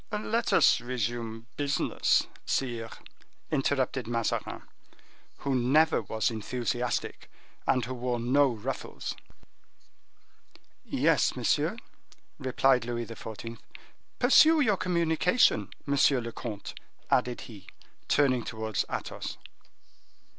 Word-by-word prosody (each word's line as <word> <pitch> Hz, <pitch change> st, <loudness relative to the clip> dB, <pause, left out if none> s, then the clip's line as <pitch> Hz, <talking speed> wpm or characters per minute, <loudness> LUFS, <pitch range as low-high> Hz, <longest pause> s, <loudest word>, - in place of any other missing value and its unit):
"Let 220 Hz, +2 st, -1 dB
us -, -, +5 dB
resume 115 Hz, -2 st, -3 dB
business, 145 Hz, 0 st, +1 dB, 0.2 s
sire," 120 Hz, -4 st, -2 dB, 0.6 s
interrupted 135 Hz, -4 st, 0 dB
Mazarin, 115 Hz, -1 st, -2 dB, 0.7 s
who 140 Hz, -, -2 dB
never 140 Hz, +6 st, +3 dB
was 110 Hz, +2 st, -1 dB
enthusiastic, 120 Hz, +2 st, -3 dB, 0.4 s
and 125 Hz, -3 st, +2 dB
who 130 Hz, -, -5 dB
wore 125 Hz, -1 st, -2 dB
no 135 Hz, +4 st, +3 dB
ruffles. 115 Hz, -4 st, -5 dB, 1.7 s
"Yes, -, -, +2 dB
monsieur," -, -, +1 dB, 0.6 s
replied 130 Hz, -1 st, +2 dB
Louis 120 Hz, 0 st, -3 dB
XIV. 115 Hz, 0 st, -8 dB, 0.6 s
"Pursue 310 Hz, +6 st, +6 dB
your 220 Hz, -8 st, +3 dB
communication, 170 Hz, -, +2 dB, 0.2 s
monsieur 140 Hz, -1 st, +3 dB
le 115 Hz, -1 st, -5 dB
comte," 110 Hz, -3 st, -6 dB, 0.4 s
added 125 Hz, -1 st, +1 dB
he, 100 Hz, -5 st, -12 dB, 0.4 s
turning 130 Hz, -4 st, +3 dB
towards 110 Hz, -2 st, -2 dB
Athos. -, -, -5 dB
125 Hz, 95 wpm, -29 LUFS, 115-140 Hz, 1.7 s, Pursue